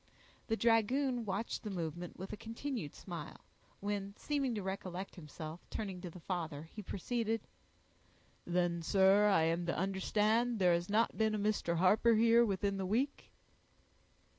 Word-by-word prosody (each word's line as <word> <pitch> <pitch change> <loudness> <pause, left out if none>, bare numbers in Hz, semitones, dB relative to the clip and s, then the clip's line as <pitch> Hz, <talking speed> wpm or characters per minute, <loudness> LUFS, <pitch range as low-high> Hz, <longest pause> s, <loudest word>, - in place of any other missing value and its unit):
The 225 - +1
dragoon 240 +2 +2
watched 200 +3 -2
the 215 - -5
movement 175 -2 -4
with 190 +1 -6
a - - -2
continued 230 - -5
smile, 170 -5 -8 0.4
when, 200 0 -3
seeming 275 -5 -1
to 205 - -3
recollect 190 -1 -4
himself, 155 0 -8
turning 195 -4 -4
to 180 - -5
the 180 - -11
father, 160 -4 -3
he 215 - -6
proceeded,— 225 +3 -2 1.0
"Then, 175 -1 0
sir, 195 +4 +5
I 195 -6 +4
am 165 +2 0
to 170 - -1
understand 210 +5 +1
there 180 -3 +4
has 170 +2 -1
not 220 +3 +2
been 220 -1 +2
a - - 0
Mr. 205 -4 0
Harper 210 +6 +5
here, 230 +1 +6
within 200 -2 0
the 190 - -2
week?" 255 +8 -1
200 Hz, 155 wpm, -35 LUFS, 175-225 Hz, 1.0 s, here